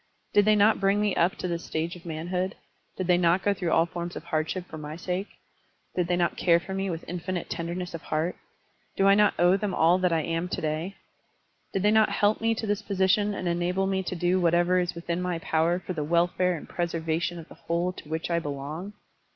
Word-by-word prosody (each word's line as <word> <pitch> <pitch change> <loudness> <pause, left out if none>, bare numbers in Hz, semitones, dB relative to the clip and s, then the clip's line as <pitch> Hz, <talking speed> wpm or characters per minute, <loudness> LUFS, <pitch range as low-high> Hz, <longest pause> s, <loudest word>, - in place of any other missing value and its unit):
Did 205 -1 +5
they 215 0 +5
not 210 +2 +4
bring 195 +1 +2
me 210 -2 +1
up 170 +3 +2
to - - -4
this 170 -1 -4
st£ige 165 +2 -2
of 175 -1 -12
manhood? 175 +4 -2 0.4
Did 185 - -2
they 175 0 +3
not 175 +2 +3
go 205 - +3
through 180 -4 -2
all 165 - +4
forms 175 0 -6
of - - -6
hardship 160 +3 -2
for 160 - -8
my 150 0 -6
sake? 180 +4 -3 0.7
Did 180 -2 +1
they 175 - +1
not 175 -1 +1
care 170 -2 +4
for 190 +2 -7
me 195 0 -1
with 165 -2 -5
infinite 180 0 -4
tenderness 175 +1 -4
of 165 - -6
heart? 160 +3 -1 0.6
Do 195 - +3
I 195 - +7
not 210 0 +4
owe 175 +2 +5
them 200 -2 -2
all 170 +3 +4
that 180 -1 +2
I 165 -1 +2
am 165 +3 -2
to - - -2
day? 160 +5 -2 0.8
Did 195 - -1
they 210 - +4
not 220 0 +5
help 210 +1 +2
me 225 0 +2
to 225 - -3
this 205 0 0
position 200 +1 +1
and 185 - -3
enable 175 +2 0
me 190 0 0
to 185 - -4
do 175 +2 +1
whatever 175 +1 +3
is 175 -1 -1
within 170 +1 -3
my 180 -1 -1
power 165 +1 +1
for 185 0 -5
the 155 -3 -2
wel 170 +3 +3
fare 180 0 0
and - - -10
preservation 170 0 -2
of 165 - -9
the - - -13
whole 170 +2 -2
to 155 - -12
which 160 +2 -3
I 170 - +2
belong? 150 +6 -5
175 Hz, 235 wpm, -27 LUFS, 170-190 Hz, 0.8 s, I